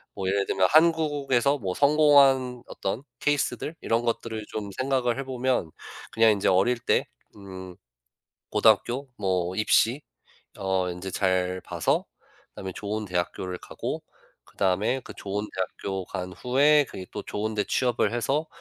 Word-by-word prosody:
뭐 95 -1 -3
예를 100 +1 +1
들면 95 -1 +3
한국에서 145 -4 +3
뭐 95 -3 -2
성공한 140 -4 +4
어떤 110 +7 -4 0.2
케이스들 145 +2 -1
이런 115 +1 +1
것들을 115 -2 -2
좀 105 -2 -5
생각을 130 -2 +1
해보면 130 -8 -1 0.4
그냥 115 -1 +5
인제 100 -2 0
어릴 100 +7 +3
때 125 - +1 0.3
음 95 -2 -9 0.7
고등학교 130 +2 +2
뭐 90 -2 0
입시 115 +5 +3 0.6
어 95 -1 0
인제 90 +2 -6
잘 95 -1 0
봐서 - - 0 0.5
다음에 95 -1 -6
좋은 105 +1 -3
대학교를 90 0 -3
가고 - - -5 0.4
그 - - -24
다음에 100 +7 +1
그 - - -11
좋은 100 +1 -3
대학교 95 +1 -3
간 90 0 -6
후에 145 - +4
그게 95 - -8
또 105 - -5
좋은데 105 0 -2
취업을 120 -4 +1
해서 140 +7 0
110 Hz, 280 characters per minute, -26 LUFS, 95-130 Hz, 0.7 s, 그냥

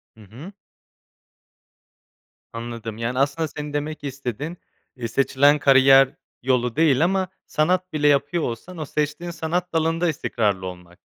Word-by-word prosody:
Hı 110 - -17
hı. 130 - -11 2.0
Anladım 115 -1 -6
yani, 120 +3 -2
aslında, 145 +4 +1
senin 150 0 -7
demek 150 +1 -4
istediğin, 140 - -5 0.4
iii, 120 -2 -5
seçilen 140 +4 +3
kariyer 135 0 +6 0.3
yolu 125 -2 +1
değil 155 -2 +3
ama 190 +1 +1 0.2
sanat 180 +3 0
bile 150 -1 +2
yapıyor 145 +4 +2
olsan 145 +10 -5
o 155 - -4
seçtiğin 150 +4 -3
sanat 170 +2 -3
dalında 165 +2 +1
istikrarlı 105 - -1
olmak 90 -1 -11
145 Hz, 130 wpm, -23 LUFS, 125-160 Hz, 2.0 s, kariyer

